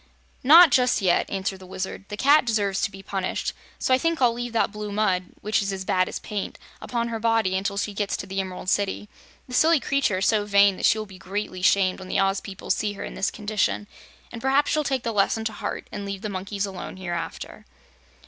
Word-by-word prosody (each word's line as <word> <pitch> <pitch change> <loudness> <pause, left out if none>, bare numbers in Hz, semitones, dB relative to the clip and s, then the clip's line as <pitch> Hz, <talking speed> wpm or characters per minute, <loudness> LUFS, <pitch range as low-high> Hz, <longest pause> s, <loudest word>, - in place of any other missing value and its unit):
"Not 320 +4 +8
just 250 -1 +3
yet," 185 -4 +2
answered 190 0 -3
the 185 - -12
Wizard. 190 +1 -5
"The 210 - -5
Cat 285 +5 +5
deserves 205 -5 0
to - - +1
be 195 -1 -12
punished, 190 -2 -2 0.2
so 260 - +1
I 255 - +4
think 330 +1 0
I'll 245 -3 +4
leave 240 0 -4
that 230 - +1
blue 210 -1 -6
mud 195 -3 +1 0.2
which 215 0 +1
is 200 0 -2
as 190 -1 -5
bad 185 0 +1
as - - -4
paint 205 -2 -5 0.2
upon 235 -1 -2
her 225 -1 -3
body 225 -4 +2
until 200 +1 -2
she 205 +1 -2
gets 200 0 -2
to - - -6
the 195 +1 -4
Emerald 185 -1 -5
City. 200 +1 0 0.4
The 250 - -10
silly 320 +4 +5
creature 265 -6 +1
is 190 - 0
so 215 -2 +3
vain 200 -1 +5
that - - +3
she - - +4
will 215 - -3
be 190 -2 -13
greatly 190 -1 -4
shamed 185 0 +3
when 185 - -9
the - - -1
Oz 195 0 +1
people 190 -1 -6
see 210 -1 0
her 200 - -7
in - - -6
this 195 - 0
condition, 210 -1 -1 0.5
and 230 - -7
perhaps 270 +3 +2
she'll 305 - +1
take 265 -3 -1
the 230 - -1
lesson 220 +2 +1
to 220 - -2
heart 205 -1 -5
and 205 - -5
leave 200 -1 -5
the 215 - -2
monkeys 195 +1 -3
alone 190 -1 -7
hereafter." 175 -3 -6
205 Hz, 235 wpm, -24 LUFS, 190-230 Hz, 0.5 s, Not